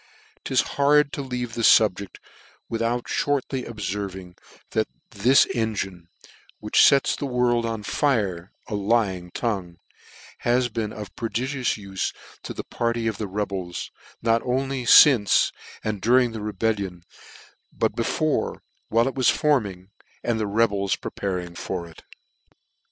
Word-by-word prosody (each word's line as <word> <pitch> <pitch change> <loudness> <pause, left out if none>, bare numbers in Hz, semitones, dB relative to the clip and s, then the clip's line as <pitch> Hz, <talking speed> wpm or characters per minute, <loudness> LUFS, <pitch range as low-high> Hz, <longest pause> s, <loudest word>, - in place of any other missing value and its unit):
" - - -32
'Tishard 145 0 +3
to - - -4
leave, 125 -3 -4
this 115 -1 +3
fubject 100 -3 -2 0.5
without 115 +1 -1
(hortly 135 -2 -1
obfervins, 95 -4 -5 0.4
that - - +1 0.2
this 120 +7 +5
engine, 95 -7 -3 0.5
which - - +2
fets 140 -1 +5
the 140 - -4
world 120 -2 +1
f* - - -1
on 110 -2 -5
fire, 100 -10 0 0.2
a 115 - -6
lying 100 -4 0
tongue, 95 -5 -3 0.6
has 120 +1 +1
been 110 -2 -3
of 105 -2 -9
prodigious 125 +2 -2
ule 100 -2 -11 0.4
to - - -7
the - - -5
party 115 -1 -2
of 110 -2 -2
the 105 - -3
rebels, 95 -3 -4 0.3
not 115 0 +3
only 130 0 -1
iince, 120 -4 +6 0.3
and 105 -3 -3
dur 120 +5 +4
ing 125 -2 +3
the 110 -1 -6
rebellion, 100 -4 -2 0.7
but - - -1
before, - - -1 0.3
while 115 +3 +3
it 135 - -2
was 130 -3 +3
forming, 100 -11 0 0.3
and 120 -2 0
the 110 - -1
rebels 100 -2 +1
preparing 90 -3 -4
for 85 0 -5
it. 80 - -15
110 Hz, 140 wpm, -24 LUFS, 100-125 Hz, 0.7 s, iince